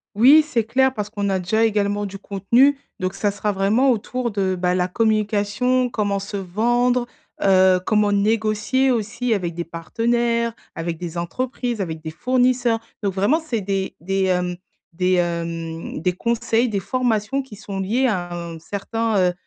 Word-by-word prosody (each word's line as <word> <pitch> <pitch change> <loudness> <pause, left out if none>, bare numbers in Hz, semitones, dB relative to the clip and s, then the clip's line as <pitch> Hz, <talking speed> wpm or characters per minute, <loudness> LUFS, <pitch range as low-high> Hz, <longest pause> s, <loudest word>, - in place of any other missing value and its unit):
Oui, 280 +8 +7
c'est 240 -6 +1
clair, 260 +4 +2
parce 210 -3 -4
qu'on 205 -2 -2
a 190 -1 +1
déjà 220 +5 +1
également 205 -1 0
du 195 0 -7
contenu, 235 +9 +2 0.2
donc 185 0 -1
ça 205 -1 0
sera 205 +1 -2
vraiment 210 +7 +3
autour 240 +1 -2
de, 190 -2 0
bah, 180 0 +1
la 180 0 +1
communication, 215 +4 +1
comment 205 -3 -1
se 200 +1 -5
vendre, 240 +6 +1 0.4
heu, 185 -1 +5
comment 210 -1 +2
négocier 220 +5 +1
aussi 235 +1 -1
avec 175 -5 -2
des 170 - -3
partenaires, 235 +7 0 0.2
avec 165 0 -4
des 170 0 -6
entreprises, 245 +4 -3
avec 160 -3 -4
des 160 0 -6
fournisseurs, 245 +2 +1 0.2
donc 200 -2 0
vraiment, 205 - +2
c'est 255 -8 -2
des 195 -1 -2
des, 195 +3 -1
hem, 180 -1 0 0.4
des, 185 +1 +1
hem, 165 -2 -3
des 180 +2 +1
conseils, 235 +3 0
des 200 -2 -1
formations 245 +2 0
qui 245 -6 -12
sont 200 -2 -5
liées 240 +7 +1
à 175 -6 -2
un 170 -1 -6
certain, 220 +5 -2
heu, 180 -1 +3
205 Hz, 165 wpm, -21 LUFS, 185-235 Hz, 0.4 s, Oui